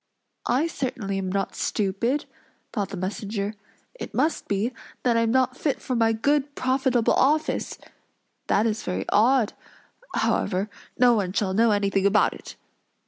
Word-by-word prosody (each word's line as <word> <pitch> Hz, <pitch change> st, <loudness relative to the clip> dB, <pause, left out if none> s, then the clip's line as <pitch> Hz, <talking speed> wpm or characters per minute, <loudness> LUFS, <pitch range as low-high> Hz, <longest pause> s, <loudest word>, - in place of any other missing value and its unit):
"I 260 Hz, +6 st, +2 dB
certainly 250 Hz, -11 st, -3 dB
am 185 Hz, -1 st, -3 dB
not 195 Hz, 0 st, -1 dB
stupid!" 220 Hz, +8 st, -1 dB, 0.5 s
thought 205 Hz, -4 st, -1 dB
the 195 Hz, -, -6 dB
messenger. 200 Hz, +2 st, -3 dB, 0.4 s
"It -, -, -8 dB
must 320 Hz, -, 0 dB
be, 205 Hz, +5 st, 0 dB, 0.3 s
that 240 Hz, -2 st, +3 dB
I -, -, +4 dB
am 230 Hz, 0 st, +2 dB
not 255 Hz, +1 st, +2 dB
fit 285 Hz, +1 st, -1 dB
for 255 Hz, -, -3 dB
my 225 Hz, -1 st, +3 dB
good, 285 Hz, +5 st, 0 dB
profitable 255 Hz, -2 st, +2 dB
office! 300 Hz, +4 st, +1 dB, 0.7 s
That 210 Hz, -, +3 dB
is 220 Hz, -1 st, 0 dB
very 95 Hz, +1 st, -3 dB
odd; 235 Hz, 0 st, +3 dB, 0.6 s
however, 200 Hz, +2 st, 0 dB, 0.3 s
no 245 Hz, -1 st, +6 dB
one 195 Hz, -5 st, 0 dB
shall 195 Hz, -2 st, 0 dB
know 230 Hz, +4 st, +4 dB
anything 200 Hz, -1 st, +2 dB
about 205 Hz, +1 st, +3 dB
it." -, -, -11 dB
225 Hz, 150 wpm, -25 LUFS, 200-255 Hz, 0.7 s, no